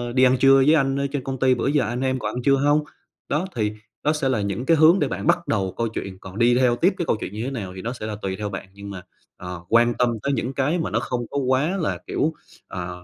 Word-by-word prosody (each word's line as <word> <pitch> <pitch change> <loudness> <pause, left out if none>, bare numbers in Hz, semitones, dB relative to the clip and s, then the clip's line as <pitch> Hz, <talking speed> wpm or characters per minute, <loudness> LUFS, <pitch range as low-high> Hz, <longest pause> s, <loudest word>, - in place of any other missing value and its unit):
đi 130 - +4
ăn 130 0 +5
trưa 135 +1 +6
với 135 +3 +5
anh 135 -2 +1
ở 140 - 0
trên 140 -3 -3
công 135 0 -4
ty, 130 0 +4
bữa 120 - -1
giờ 145 -1 +2
anh 120 +4 -3
em 130 0 0
còn 105 -2 -4
ăn 125 - -3
trưa 135 +1 +4
hông?" 145 +2 +2 0.5
Đó, 150 +5 0
thì 105 -2 0 0.3
đó 150 - +2
sẽ 150 -3 0
là 120 -5 +1
những 100 +5 -3
cái 165 +2 +4
hướng 160 +5 +6
để - - +1
bạn - - -4
bắt 175 - +2
đầu 95 -4 -1
câu 115 - 0
chuyện, 100 -4 -6
còn 95 +1 -10
đi 120 +1 +4
theo 125 -1 +3
tiếp 180 +10 +2
cái 175 - -2
câu - - +2
chuyện - - -5
như 110 +2 -4
thế 130 - -3
nào 100 -8 -5
thì 95 - -7
nó 115 +4 -3
sẽ 120 - -7
là 110 -1 -4
tùy 95 -1 -2
theo 105 -1 -3
bạn. 95 -1 -6
Nhưng 100 0 -9
mà, 95 -2 -7 0.4
ờ, 90 -1 -7
quan 120 +1 +4
tâm 125 0 +1
tới 140 - 0
những 125 +1 -2
cái 140 +6 0
mà 165 - -2
nó - - +1
không 120 -1 -3
có 140 - -3
quá 140 +7 +1
là, 165 - -1
kiểu, 160 - 0 0.3
ờ, 90 -1 -6
125 Hz, 295 wpm, -23 LUFS, 105-140 Hz, 0.5 s, trưa